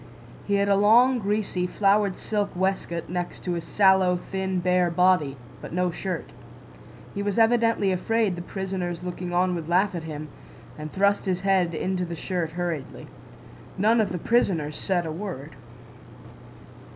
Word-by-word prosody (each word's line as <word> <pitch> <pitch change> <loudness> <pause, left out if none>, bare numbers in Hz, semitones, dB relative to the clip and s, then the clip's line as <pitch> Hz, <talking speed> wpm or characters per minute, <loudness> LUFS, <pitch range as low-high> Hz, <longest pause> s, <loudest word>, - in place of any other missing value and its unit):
He 200 - +2
had 200 0 +2
a 200 - +4
long, 240 +6 +5
greasy, 200 -3 -1
flowered 200 0 +2
silk 205 -3 -2
waistcoat 185 -2 -1
next 175 0 -4
to 180 - -2
his 170 -1 -3
sallow, 190 -2 +4
thin 190 -1 -1
bare 180 0 +2
body, 170 -5 +2 0.2
but - - -8
no 180 0 +1
shirt. 185 +2 -5 0.8
He 200 - -3
was 200 -1 -2
evidently 230 -3 +3
afraid 210 +1 0
the 175 - -6
prisoners 180 -2 -4
looking 180 0 -5
on 180 +1 +2
would 165 -2 -5
laugh 190 +3 +2
at 170 -2 -5
him, 155 -1 -6 0.5
and 155 0 -7
thrust 200 +1 +2
his 185 -2 -1
head 185 -4 +2
into 185 +2 -1
the 170 -1 -4
shirt 165 -1 -3
hurriedly. 170 -6 -4 0.7
None 220 +4 +4
of 210 - -1
the 180 - -2
prisoners 165 -8 +1
said 180 -3 -1
a 160 - -3
word. 160 -5 -6
185 Hz, 160 wpm, -25 LUFS, 175-200 Hz, 0.8 s, long